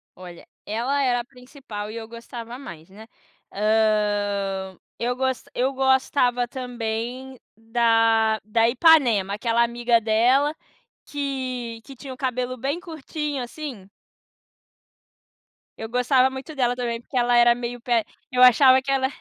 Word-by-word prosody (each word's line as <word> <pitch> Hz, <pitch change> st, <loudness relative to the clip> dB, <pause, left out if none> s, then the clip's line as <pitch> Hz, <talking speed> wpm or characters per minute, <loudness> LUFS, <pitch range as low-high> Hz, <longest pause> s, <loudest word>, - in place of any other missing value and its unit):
Olha, 175 Hz, -2 st, -12 dB, 0.2 s
ela 245 Hz, +7 st, -1 dB
era 245 Hz, -2 st, +1 dB
a 240 Hz, -, -5 dB
principal 250 Hz, -5 st, -9 dB
e -, -, -9 dB
eu 225 Hz, -1 st, -7 dB
gostava 235 Hz, +1 st, -9 dB
mais, 170 Hz, -, -11 dB
né. 215 Hz, +3 st, -14 dB, 0.5 s
Hã, 205 Hz, -3 st, 0 dB, 0.2 s
eu 245 Hz, +1 st, -1 dB
gos 260 Hz, 0 st, -1 dB
eu 260 Hz, +2 st, 0 dB
gostava 265 Hz, -2 st, +2 dB
também 245 Hz, +1 st, -5 dB, 0.2 s
da 225 Hz, -1 st, +2 dB
da 225 Hz, +2 st, +2 dB
Ipanema, 240 Hz, -, +4 dB
aquela 230 Hz, +1 st, +1 dB
amiga 235 Hz, 0 st, +1 dB
dela 245 Hz, +7 st, +3 dB, 0.5 s
que 255 Hz, -5 st, -4 dB
que 275 Hz, -, -11 dB
tinha 265 Hz, +1 st, -9 dB
o -, -, -13 dB
cabelo 255 Hz, -1 st, -2 dB
bem 275 Hz, +7 st, -2 dB
curtinho, 305 Hz, -4 st, -5 dB
assim. 240 Hz, -7 st, -8 dB, 1.9 s
Eu 225 Hz, -, -6 dB
gostava 250 Hz, +2 st, +3 dB
muito 265 Hz, +3 st, -8 dB
dela 245 Hz, -2 st, +1 dB
também, 240 Hz, -2 st, -3 dB
porque 240 Hz, -, -14 dB
ela 245 Hz, -1 st, +3 dB
era 240 Hz, 0 st, +6 dB
meio 245 Hz, 0 st, -5 dB
pé 235 Hz, -1 st, +1 dB, 0.3 s
eu 250 Hz, 0 st, +1 dB
achava 260 Hz, +1 st, +7 dB
que 275 Hz, +1 st, -3 dB
ela 265 Hz, -1 st, +2 dB
245 Hz, 135 wpm, -23 LUFS, 225-260 Hz, 1.9 s, achava